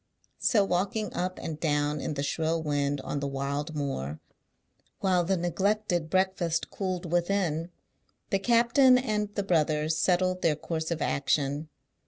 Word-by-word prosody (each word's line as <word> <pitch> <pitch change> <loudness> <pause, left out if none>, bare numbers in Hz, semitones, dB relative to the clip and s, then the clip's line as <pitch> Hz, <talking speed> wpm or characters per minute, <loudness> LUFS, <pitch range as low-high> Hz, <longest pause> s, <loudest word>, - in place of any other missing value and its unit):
So 205 -4 +3
walking 195 +3 -1
up 185 +1 -2
and 155 -2 -5
down 145 -2 0
in 150 - -3
the 140 - -2
shrill 160 +2 -1
wind 145 -2 0
on 145 - -3
the 140 - -2
wild 140 +3 -3
moor, 80 - -3 0.8
while 185 -2 +2
the 190 +2 +1
neglected 175 0 0
breakfast 185 -3 0
cooled 185 -3 -3
within, 175 -2 0 0.6
the 195 - +2
captain 240 +4 +5
and 215 -5 -1
the 200 - 0
brothers 155 -3 +1
settled 185 +2 +1
their 155 -2 +3
course 160 +1 -4
of 170 -2 -1
action. 145 +2 0
170 Hz, 145 wpm, -28 LUFS, 150-190 Hz, 0.8 s, captain